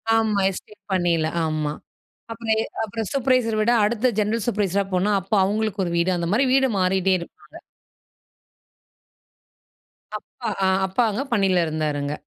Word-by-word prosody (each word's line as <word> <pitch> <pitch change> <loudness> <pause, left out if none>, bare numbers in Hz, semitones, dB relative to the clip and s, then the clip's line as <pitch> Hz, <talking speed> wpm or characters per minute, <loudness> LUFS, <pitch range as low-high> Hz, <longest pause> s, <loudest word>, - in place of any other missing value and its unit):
ஆமா. 220 -2 +1
எஸ்டேட் 205 +2 -10
பணில 170 -3 +1 0.2
ஆமா. 155 -1 -2 0.6
அப்புறம் 225 -1 -4
எ - - 0 0.2
அப்புறம் 220 0 -5
சுப்ரவைசர் 255 -4 +1
விட 225 +3 +2
அடுத்த 235 +3 +1
ஜென்ரல் 215 +1 0
சூப்பர்வைசர் 200 -4 0
அ - - -3
போனா 190 +3 +1
அப்போ 195 +3 -2
அவங்களுக்கு 210 0 -1
ஒரு 170 - -3
வீடு 170 +2 +2
அந்த 170 -1 -2
மாரி 265 +5 +3
வீடு, 265 0 +4
மாறிட்டே 190 +1 +2
இருப்பாங்க. 170 - -13 2.6
அப்பா 235 -3 -6 0.2
ஆ - - +3 0.2
அப்பா 215 +6 +1
அங்க 245 +7 -2
பணியில 190 -5 +2
இருந்தாருங்க. 150 -2 -2
200 Hz, 140 wpm, -23 LUFS, 175-225 Hz, 2.6 s, வீடு